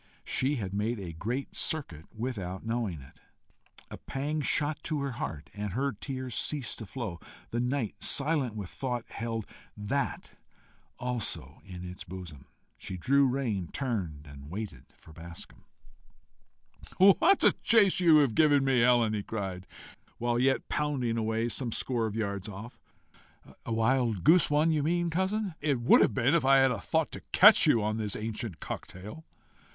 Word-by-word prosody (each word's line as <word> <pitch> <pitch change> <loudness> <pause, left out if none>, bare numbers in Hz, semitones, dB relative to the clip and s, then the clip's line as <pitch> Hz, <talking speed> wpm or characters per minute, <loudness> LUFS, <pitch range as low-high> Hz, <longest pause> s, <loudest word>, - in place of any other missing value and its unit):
She 135 +3 0
had 100 -7 -4
made 105 +3 -1
a 90 -4 -6
great 120 - -4
circuit 85 - -3
without 105 -5 -5
knowing 110 - -2
it. 65 - -17 0.7
A - - -8
pang 150 +3 -3
shot 150 +1 0
to 155 -2 -1
her 140 -1 -2
heart, 80 -10 -6
and 105 -2 -5
her 140 +5 0
tears 130 +3 -6
ceased 140 -1 -1
to 110 - -7
flow. 105 -8 -5 0.3
The 120 - -1
night, 125 -2 -2
silent 140 -5 +1
with 100 -4 -6
thought, 125 -3 -3
held 115 -2 -4 0.3
THAT 105 +7 -3 0.7
also 125 -3 -1
in 90 -1 -8
its 90 +1 -8
bosom! 85 -7 -10 0.3
She 95 - -6
drew 140 +9 +3
rein, 120 -9 -1
turned, 95 - -3
and 70 0 -12
waited 95 - -6
for 80 - -16
Bascombe. 85 +1 -11 1.3
"What 200 - +5
a - - +7
chase 210 -6 +5
you've 155 -8 +5
given 145 -2 +4
me, 135 -2 +3
Helen!" 120 -2 +4
he 105 - -1
cried, 95 -4 -5 0.5
while 120 0 0
yet 135 +1 +1
pounding 135 -6 -1
away 110 0 0
some 120 0 -2
score 115 -1 -1
of 105 - -6
yards 100 -2 -3
off. 105 +4 -9 0.9
"A - - -3
wild 115 -3 +1
goose 170 +2 +6
one 150 +2 +3
you 155 -2 +1
mean, 170 +3 0
cousin?" 190 +3 -1
"It 145 -4 +1
would 120 - +5
have 105 - +2
been 125 +6 +2
if 170 -4 +3
I 135 +1 +5
had 135 -2 +4
thought - - 0
to - - -8
catch - - +8
you 115 - +4
on 110 +1 -1
this 105 -3 -3
ancient 110 - -5
cocktail." 105 - -8
120 Hz, 160 wpm, -29 LUFS, 100-140 Hz, 1.3 s, catch